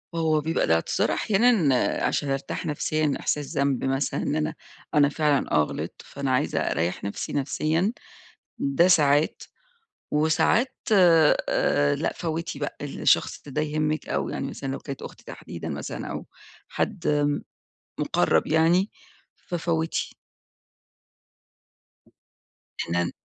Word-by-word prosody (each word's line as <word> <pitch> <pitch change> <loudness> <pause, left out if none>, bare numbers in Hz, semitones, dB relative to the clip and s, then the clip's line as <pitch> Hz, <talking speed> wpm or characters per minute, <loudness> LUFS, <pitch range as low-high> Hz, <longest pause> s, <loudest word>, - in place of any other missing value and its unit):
هو 160 -2 +2
بيبقى 160 +2 0
الإعتذار 80 0 +1
أحيانًا 195 - +2
عشان 145 - 0
أرتاح 135 0 -3
نفسيًا، 155 0 0
إحساس 150 +2 -2
ذنب 140 -2 +1
مثلًا 135 +1 0
إن - - -1
أنا 155 0 -1 0.4
أنا 145 -1 +5
فعلًا 150 -1 +1
آه، 75 - +4
غلطت، - - -6
فأنا 140 -1 -3
عايزة 130 - +1
أريح 85 +4 -1
نفسي 100 - -4
نفسيًا 155 - 0 0.6
ده 140 +6 +3
ساعات، 150 -3 +3 0.7
وساعات 160 - +2 0.2
آآ، 160 - +4
لأ - - -1
فوتي 165 -3 -4
بقى، 145 - -4
الشخص 145 - +1
ده 150 +2 -2
يهمِك 155 0 -1
أو 70 0 -1
يعني - - -3
مثلًا 135 - -6
لو 135 - -4
كانت 140 -2 -7
أختي - - -10
تحديدًا - - -8
مثلًا - - -5
أو - - -5 0.4
حد 145 -1 0 0.7
مُقرب - - +2
يعني 170 +5 +3 0.5
ففوتي. 165 -2 -2 2.6
إحنا 85 +1 0
ن 85 - -3
150 Hz, 120 wpm, -25 LUFS, 140-160 Hz, 2.6 s, أنا